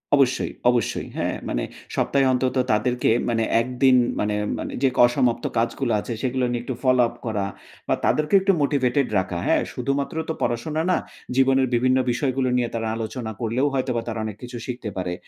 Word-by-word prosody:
অবশ্যই, 135 -2 +2 0.2
অবশ্যই, 120 -2 0
হ্যাঁ, - - -1
মানে - - -1 0.3
সপ্তাহে 140 -1 +2
অন্তত 130 +1 0 0.2
তাদেরকে 120 +4 +1 0.2
মানে 115 -1 +1 0.2
১ 120 - -4 0.2
দিন 130 -1 +7 0.2
মানে, 105 0 0 0.2
মানে - - -4
যে - - +6 0.2
অসমাপ্ত 120 -1 +1
কাজগুলো 120 +2 0
আছে, 120 - -4
সেগুলো 130 -1 0
নিয়ে 120 -1 -2
একটু 130 - -4
ফলো 130 -1 +4
আপ 120 - -10
করা 105 -3 -1 0.4
বা - - +2
তাদেরকে 150 +4 +1
একটু 195 0 +3
মোটিভেটেড 140 -2 +2
রাখা। 95 -2 -3
হ্যাঁ? - - +3
শুধুমাত্র 140 +2 -2
তো - - +1
পড়াশোনা 150 +7 -1
না, - - +3 0.4
জীবনের 135 0 +4
বিভিন্ন 130 +2 +3
বিষয়গুলো 130 0 0
নিয়ে 120 -1 0
তারা 115 -1 -2
আলোচনা 115 0 -4
করলেও 120 +5 0
হয়তোবা 125 -3 0
তারা 115 -1 -3
অনেক 105 -2 -6
কিছু 120 0 -7
শিখতে 120 -3 -4
পারে। 90 -1 -2
125 Hz, 175 wpm, -23 LUFS, 115-135 Hz, 0.4 s, দিন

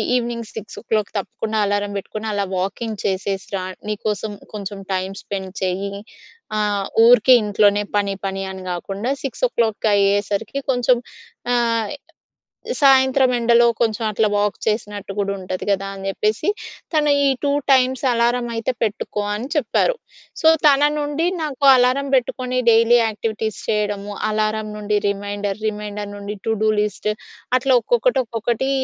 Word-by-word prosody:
Evening 235 -2 -2
6:00 215 -1 -3
తప్పకుండా 220 +2 -3
alarm 205 0 -1
పెట్టుకొని 215 +2 -5
అలా 200 -1 0
వాకింగ్ 200 +3 -3
చేసేసి 195 0 -2
రా. 185 - -4 0.2
నీకోసం 210 0 -2 0.2
కొంచెం 200 -1 -6
టైమ్ 190 +1 -2
స్పెండ్ 190 -2 -5
చేయి. 190 +2 -2 0.6
ఆహ్, 205 -2 0 0.2
ఊరికే 245 +1 +7
ఇంట్లోనే 205 0 +3
పని, 200 -1 0
పని, 195 0 -3
అని 190 0 -8
కాకుండా 195 +6 -4 0.2
6:00 235 - 0
అయ్యేసరికి 205 +4 +1
కొంచెం 245 0 +3 0.6
ఆహ్, 230 -2 +1 0.9
సాయంత్రం 265 -1 +5
ఎండలో 235 0 +4
కొంచెం 225 -1 0
అట్ల 215 +1 +1
వాక్ 205 0 +1
చేసినట్టు 210 -2 -2
కూడా 200 -1 0
ఉంటది 185 0 -5
కదా! 195 0 0
అని 195 0 -6
చెప్పేసి 215 - 0 0.4
తను 300 -2 +3 0.2
ఈ - - +4
2 285 - +2 0.2
టైమ్స్ 260 0 +3
అలారం 240 +1 +1
అయితే 225 +2 -1
పెట్టుకో 210 -1 -2
అని 230 +5 -5
చెప్పారు. 300 - +2 0.5
సో, 320 - +4 0.2
తన 280 -1 +5 0.2
నుండి 295 +2 -1 0.2
నాకు 290 -3 -4
అలారం 255 +3 +2
పెట్టుకొని 255 0 -1
డైలీ 230 +1 +5
యాక్టివిటీస్ 220 -1 -3
చేయడము 205 -1 -1 0.2
అలారం 215 0 -1
నుండి 210 0 0
రిమైండర్, 205 0 -3
రిమైండర్ 210 -1 -5
నుండి 205 +1 -6
టూ 225 - +2
డూ 220 - +4
లిస్ట్ 210 0 -2 0.5
అట్లా 260 0 +2
ఒక్కొక్కటి, 485 - +2
ఒక్కొక్కటి 235 +3 -2
215 Hz, 135 wpm, -20 LUFS, 200-240 Hz, 0.9 s, ఊరికే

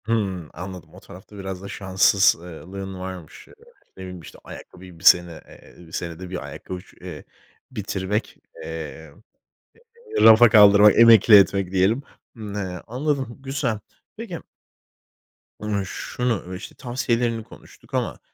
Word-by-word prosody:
Hımm, 100 -7 -2
anladım. 90 -1 -9
O - - -13
tarafta 95 +3 -14
biraz 95 -1 -6
da 100 - -8
şanssız 95 0 +3
ııı, 85 0 -11
lığın 95 -1 -6
varmış. 90 -4 -9
Iıı, - - -18 0.4
ne - - -10
bileyim, 90 -1 -8
işte, - - -13
ayakkabıyı 90 -2 -12
1 - - -17
sene 85 -3 +4
eee, 85 -2 -17
senede 85 +2 -6
1 90 -1 -6
ayakkabı 90 - -8
ç - - -22
eee, 90 -5 -9 0.5
bitirmek, 105 -2 -3 0.3
eee, 80 -1 -8 1.1
eee, - - +2
rafa 115 +2 +8
kaldırmak, 105 -1 +7
emekli 115 -1 +7
etmek 100 -2 +3
diyelim. 95 +8 +2 0.3
Imm, 105 -3 -8
he, 95 -4 -4
anladım, 130 0 -2
güzel. 135 -5 -2 0.4
Peki - - -6 1.2
ımm, 105 -2 -2
şunu, 105 -2 -3
işte, 90 - -10
tavsiyelerini 120 -2 -2
konuştuk - - -18
ama, - - -2
95 Hz, 135 wpm, -23 LUFS, 90-110 Hz, 1.2 s, rafa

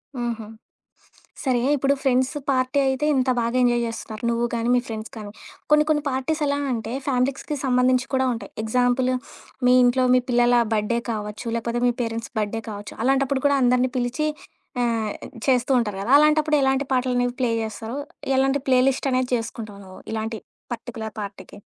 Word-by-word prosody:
హుహు. 235 -3 -3 1.0
సరే, 255 -3 +2 0.2
ఇప్పుడు 275 +1 +2
ఫ్రెండ్స్ 260 0 +2 0.2
పార్టీ 255 +1 +1
అయితే 265 +2 0
ఇంత 260 -1 +2
బాగా 235 +1 0
ఎంజాయ్ 240 -1 +3
చేస్తున్నారు 225 0 -6
నువ్వు 235 0 0
కానీ, 230 +1 -1
మీ 245 - +4
ఫ్రెండ్స్ 220 -1 -6
కానీ. 210 -2 -7 0.4
కొన్ని 300 0 +6
కొన్ని 300 -1 +2
పార్టీస్ 265 +5 -1
ఎలా 285 0 0
అంటే 225 0 -3
ఫ్యామిలీస్‌కి 270 +3 -1
సంబంధించి 255 0 +3
కూడా 260 0 +2
ఉంటాయి. 230 - -7
ఎగ్జాంపుల్, 245 +3 +2 0.6
మీ 250 - +6
ఇంట్లో 255 +1 +3
మీ 255 - +5
పిల్లల 240 0 +4
బర్త్‌డే 220 +2 +1
కావచ్చు, 210 +2 -5
లేకపోతే 235 +1 -2
మీ 245 - +3
పేరెంట్స్ 230 0 -4
బర్త్‌డే 215 +1 -2
కావచ్చు. 205 -1 -8
అలాంటప్పుడు 270 0 +1
కూడా 285 0 +4
అందరినీ 250 +1 +3
పిలిచి 255 +6 -1 0.5
ఆహ్, 225 -3 0 0.4
చేస్తూ 260 0 +2
ఉంటారు 210 -4 -1
కదా! 230 - -3
అలాంటప్పుడు 305 0 +4
ఎలాంటి 270 +1 +2
పాటలనేవి 245 -1 +1
ప్లే 245 -2 +2
చేస్తారో, 220 +3 -5 0.4
ఎలాంటి 270 +1 +2
ప్లే 255 -1 +5
లిస్ట్ 270 +1 -1
అనేది 255 0 +1
చేసుకుంటావు 225 -3 -5
నువ్వు, 185 0 -12
ఇలాంటి 220 0 -3 0.3
పర్టిక్యులర్ 225 -2 -6
పార్టీకి? 200 -1 -8
245 Hz, 160 wpm, -23 LUFS, 225-265 Hz, 1.0 s, కొన్ని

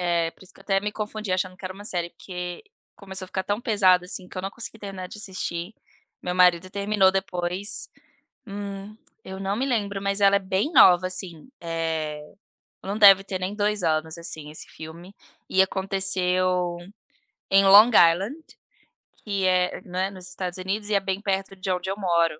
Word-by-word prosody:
Eh, 170 -2 +1
por - - -18
isso 180 - -18
que - - -19
eu - - -13
até 195 -1 +1
me 210 +1 -3
confundi 215 -2 -4
achando 185 0 -1
que 190 - -14
era 185 - -5
uma 205 +2 -11
série, 175 -4 -3
que 180 -1 -7 0.3
começou 190 -1 -7
a - - -12
ficar 190 - -2
tão 205 +3 -2
pesado, 190 -6 +3
assim, 180 0 -5
que - - -8
eu 185 - -4
não 195 - -3
consegui 225 0 -7
terminar 195 -3 -7
de 210 - -10
assistir. 185 -1 -5 0.5
Meu 180 0 -2
marido 180 0 +4
terminou 200 -1 +2
depois 185 +1 -2 0.6
hum, 200 0 -7 0.3
eu 190 0 -8
não 195 +1 -1
me 265 - -1
lembro, 205 -6 -1
mas 200 0 +1
ela 200 0 +5
é - - +1
bem 190 - -1
nova, 180 - +7
assim. 180 0 -4
É, 160 -2 -3 0.6
não 200 +2 -3
deve 195 -2 +8
ter 190 -1 -4
nem 185 +2 -3
2 210 -1 0
anos, 160 0 0
assim, 155 -3 -6
esse 155 - -8
filme 170 +4 -11 0.4
e 190 - +3
aconteceu 185 -2 +1 0.7
em 195 0 +5
Long 205 +4 +8
Island, 190 - +4 0.9
que 200 -3 -1
é 180 -1 +1
né, 185 +1 -2
nos 185 -2 -10
Estados 180 -1 -5
Unidos 205 +3 -3
e - - 0
é - - +4
bem 190 0 -2
perto 195 -1 -2
de 190 0 -3
onde 180 0 -2
eu 195 - -4
moro, 170 -5 +1
190 Hz, 190 wpm, -25 LUFS, 180-200 Hz, 0.9 s, deve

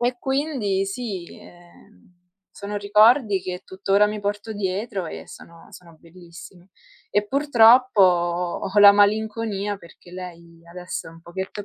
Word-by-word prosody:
e 245 +1 -1
quindi 265 -8 -1
sì, 195 -4 -6
ehm, 175 - -20 0.5
sono 205 +1 -6
ricordi 210 +1 +3
che 180 0 -7
tuttora 195 +2 +1
mi 210 0 -4
porto 205 +2 -4
dietro 195 -1 -4
e - - -9
sono 165 0 -15
sono 170 -2 -16
bellissimi. 175 +2 -15 0.4
E 205 0 0
purtroppo, 255 -3 +4
ho 175 +2 0
la 200 0 +9
malinconia 205 0 0
perché 175 -1 -18
lei 170 -2 -11
adesso 180 0 -7
è - - -12
un 165 0 -16
pochetto 190 +4 -7
200 Hz, 135 wpm, -22 LUFS, 175-215 Hz, 0.5 s, la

